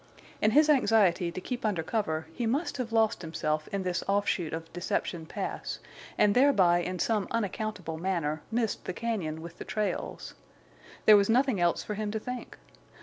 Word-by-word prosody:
In 215 - +4
his 300 +7 +5
anxiety 205 - +3
to 180 - -5
keep 245 +6 -5
under 200 -7 0
cover 160 -5 -1
he 235 +6 -2
must 285 +7 -1
have 245 -3 -3
lost 225 -4 +2
himself 155 -2 -2
in 200 -1 -3
this 180 -1 -1
offshoot 195 -4 +1
of 165 0 -6
Deception 170 -1 -2
Pass, - - -4 0.4
and 205 -1 +4
thereby 200 -10 +5
in 180 +1 -3
some 210 0 0
unaccountable 205 -6 -3
manner, 165 -4 -1
missed 225 -1 -1
the 185 - -4
cañon 205 -10 -2
with 170 +1 -10
the - - -4
trails. 210 -1 -3 0.7
There 215 -1 +9
was 200 +1 +2
nothing 250 -2 +3
else 175 -1 +2
for 210 - -4
him 210 0 -3
to 220 +1 -2
think. 250 +2 -7
200 Hz, 175 wpm, -29 LUFS, 170-225 Hz, 0.7 s, There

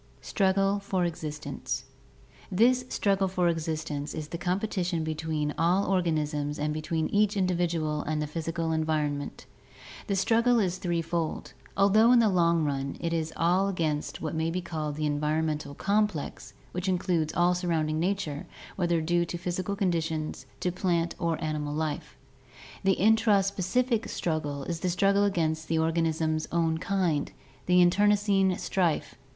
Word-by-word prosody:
Struggle 195 0 +1
for 190 -2 -1
Existence.— 155 -3 -4 0.7
This 245 +6 +3
struggle 195 -1 +1
for 180 -1 +1
existence 155 -3 -2
is 155 -1 -5
the 170 - -4
competition 180 -2 -1
between 155 -1 -2
all 180 +4 +3
organisms 155 -5 0
and 150 +1 -1
between 155 +1 -1
each 210 0 +2
individual 170 -5 0
and 155 +1 -2
the 150 - -1
physical 165 +1 -3
environment. 155 -3 -1 0.6
The 200 - 0
struggle 230 +5 +3
is 185 -3 0
threefold, 170 -2 -2 0.2
although 210 +4 +5
in 250 - +7
the 230 -2 +5
long 170 -3 +3
run 140 -2 -2
it 170 -1 -2
is 160 -1 -1
all 180 +4 +3
against 160 -6 -2
what 155 - -2
may 160 0 0
be 175 +2 -1
called 155 -4 -4
the 155 0 -2
environmental 150 0 -1
complex, 205 -5 -1 0.2
which 180 +2 -2
includes 175 -4 0
all 175 +1 +4
surrounding 160 -3 0
nature, 170 -5 -2 0.3
whether 175 -3 +1
due 175 +2 +2
to 175 - -5
physical 180 +3 -3
conditions, 165 -5 -2
to 180 - 0
plant 175 -2 0
or 165 -2 0
to - - -7
animal 150 -1 -2
life. 155 -1 -3 0.7
The 195 -1 +3
intraspecific 215 +2 +2
struggle 150 -4 -2
is 170 +3 -4
the 180 - -1
struggle 200 +3 +3
against 160 -5 0
the 165 - 0
organism's 160 -1 0
own 165 -1 +1
kind, 180 -6 0 0.4
the 180 0 +5
internecine 200 0 +3
strife. 165 -6 0
170 Hz, 145 wpm, -28 LUFS, 155-190 Hz, 0.7 s, in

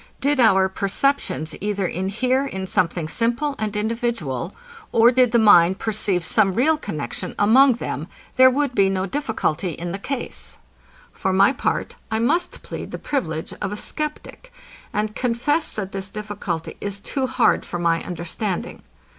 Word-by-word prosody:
Did 285 0 +1
our 195 -5 +5
perceptions 200 - 0
either 200 -1 -1
inhere 230 +10 0
in 190 -9 -4
something 170 -3 0
simple 240 - 0
and 215 -1 -2
individual, 210 - -2 0.4
or 230 +1 +6
did 250 -2 +4
the 240 - +4
mind 190 -5 +6
perceive 200 -5 0
some 195 -4 +3
real 305 +7 +4
connexion 150 - -5
among 250 +6 +6
them, 235 - -5 0.3
there 260 0 +8
would 275 0 0
be 195 -4 +3
no 190 -1 -1
difficulty 195 - -2
in 170 +3 -5
the 195 - -4
case. 270 +5 -5 0.6
For 190 - -1
my 195 +7 +5
part, - - -2
I 220 - 0
must 305 +11 0
plead - - -7
the - - -5
privilege 160 - -3
of 195 - -2
a 210 - -4
sceptic, 305 - -6 0.4
and 210 0 -1
confess, 250 +7 0
that 195 -3 -4
this 195 0 -5
difficulty 205 -6 -5
is 200 0 -4
too 260 +5 -2
hard 260 - +2
for 175 - -5
my 170 -1 +1
understanding. 175 +3 -4
210 Hz, 155 wpm, -22 LUFS, 190-255 Hz, 0.6 s, there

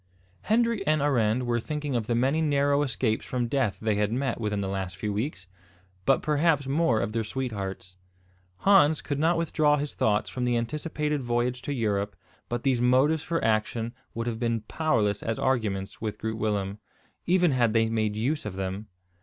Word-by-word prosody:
Hendrik 230 -1 +2
and 155 0 +3
Arend 125 -4 +2
were 120 -1 +1
thinking 150 +1 -3
of 115 -3 -1
the 120 - +1
many 135 +6 +2
narrow 145 -1 +2
escapes 125 -5 0
from 125 -1 -2
death 120 -4 0
they 110 -1 0
had 105 0 +1
met 125 -1 -1
within 105 -2 -1
the 95 - -2
last 95 -2 -3
few 105 +2 -3
weeks, 105 - -3 0.6
but 135 - +4
perhaps 150 -1 +2
more 135 -4 +2
of - - -1
their 115 0 -1
sweethearts. 100 -6 -5 0.6
Hans 170 -6 +5
could 145 -1 -2
not 165 +3 +3
withdraw 150 -2 +2
his 145 0 -3
thoughts 105 -1 +1
from 125 - -4
the 120 -1 +2
anticipated 150 +4 -2
voyage 120 +1 -1
to 145 - -4
Europe 105 -5 -1 0.3
but 120 0 -3
these 130 -3 +2
motives 130 +6 +3
for 165 +1 -2
action 110 +1 0 0.2
would 115 0 -2
have 115 -2 -3
been 115 -2 0
powerless 110 -6 0
as 115 -1 -2
arguments 105 -7 -1
with 105 -2 -3
Groot 110 0 -4
Willem, 105 -1 -1 0.5
even 175 -2 +4
had 120 -4 +2
they 115 -1 +3
made 110 -2 0
use 130 +8 -1
of 105 -3 -5
them. 95 +2 -4
120 Hz, 185 wpm, -27 LUFS, 110-145 Hz, 0.6 s, Hans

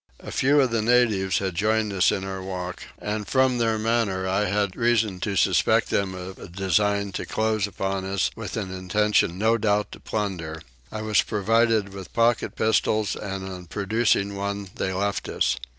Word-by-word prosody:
A - - -9
few 145 +3 +3
of 130 -3 +1
the 115 -1 +1
natives 110 -6 +3
had 95 -2 -2
joined 105 +2 +1
us 95 -1 +3
in 95 - -2
our 95 -1 -5
walk 90 -1 -5
and 105 -1 -4
from 130 -2 +2
their 115 -1 +1
manner 110 -4 0
I 95 +3 +1
had 100 -1 0
reason 115 -5 +1
to 100 +2 -2
suspect - - +3
them 95 -2 0
of 95 +1 -8
a - - -9
design 100 +2 0
to - - -4
close 110 -2 0
upon 95 -1 -3
us, 95 -1 0
with - - -6
an 95 -4 -4
intention 95 -1 +1
no 110 +3 +2
doubt 105 0 +1
to - - -10
plunder: 90 -7 -3 0.3
I 110 0 -5
was 110 -2 +3
provided 110 0 +2
with 95 -2 -9
pocket 115 0 +2
pistols 110 -1 +1
and 95 -2 -5
on 90 -2 -8
producing 100 +1 +1
one 100 -1 -4
they 95 - -2
left 100 +2 -2
us. - - +1
100 Hz, 180 wpm, -25 LUFS, 95-110 Hz, 0.3 s, few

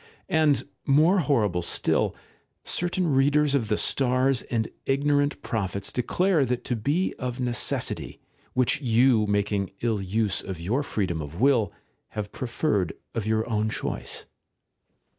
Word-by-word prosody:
And, 155 -3 +2 0.2
more 155 +7 +5
horrible 110 - +1
still, 85 - +1 0.5
certain 175 -2 0
readers 145 +2 +3
of 130 -6 +1
the 105 - +1
stars 130 -1 +2
and 115 -2 -2 0.2
ignorant 145 +1 +2
prophets 100 -4 -2
declare 165 +6 +2
that 125 -1 -1
to 125 - -1
be 145 - 0
of 125 -1 -4
necessity, 120 -1 -2 0.3
which 130 +3 +1
you, 120 -3 +4
making 100 -1 0
ill 115 -4 0
use 100 +1 0
of 95 -3 -6
your 105 +12 0
freedom 95 - -2
of 75 +4 -7
will, 125 -4 +3 0.5
have 105 -1 -3
preferred 120 - -1 0.2
of 110 -2 -3
your 110 0 +1
own 110 -2 0
choice. - - -4
120 Hz, 135 wpm, -26 LUFS, 105-140 Hz, 0.5 s, more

